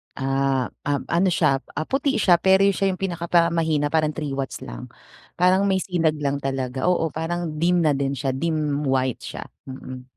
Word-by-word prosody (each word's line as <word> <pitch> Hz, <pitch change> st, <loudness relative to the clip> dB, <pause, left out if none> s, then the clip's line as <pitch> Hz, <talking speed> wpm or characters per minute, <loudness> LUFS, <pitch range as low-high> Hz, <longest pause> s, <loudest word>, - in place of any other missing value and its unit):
Ah, 135 Hz, -1 st, 0 dB, 0.2 s
um, 145 Hz, -1 st, -2 dB
ano 180 Hz, +2 st, +2 dB
siya 135 Hz, -5 st, +2 dB
ah 155 Hz, -, -4 dB
puti 270 Hz, -2 st, 0 dB
siya 180 Hz, -4 st, +5 dB
pero 190 Hz, +2 st, +4 dB
siya 195 Hz, 0 st, +1 dB
yung 185 Hz, -, -6 dB
pinaka 170 Hz, -3 st, -4 dB
parang 170 Hz, -1 st, +4 dB
mahina 155 Hz, -3 st, +1 dB
parang 155 Hz, 0 st, +1 dB
3 150 Hz, -3 st, -4 dB
watts 135 Hz, -1 st, -4 dB
lang. -, -, -9 dB, 0.5 s
Parang 185 Hz, +2 st, +4 dB
may 195 Hz, -1 st, +2 dB
sinag 165 Hz, -5 st, 0 dB
lang 140 Hz, -1 st, 0 dB
talaga 130 Hz, -1 st, -3 dB
oo 165 Hz, -2 st, +1 dB
parang 170 Hz, +2 st, -2 dB
dim 175 Hz, +3 st, +2 dB
na 155 Hz, -4 st, +2 dB
din 135 Hz, 0 st, -1 dB
siya 135 Hz, -1 st, -2 dB
dim 150 Hz, -1 st, -1 dB
white 130 Hz, -2 st, 0 dB
siya, -, -, -7 dB, 0.2 s
mm. 130 Hz, -1 st, -9 dB
155 Hz, 190 wpm, -23 LUFS, 135-175 Hz, 0.5 s, siya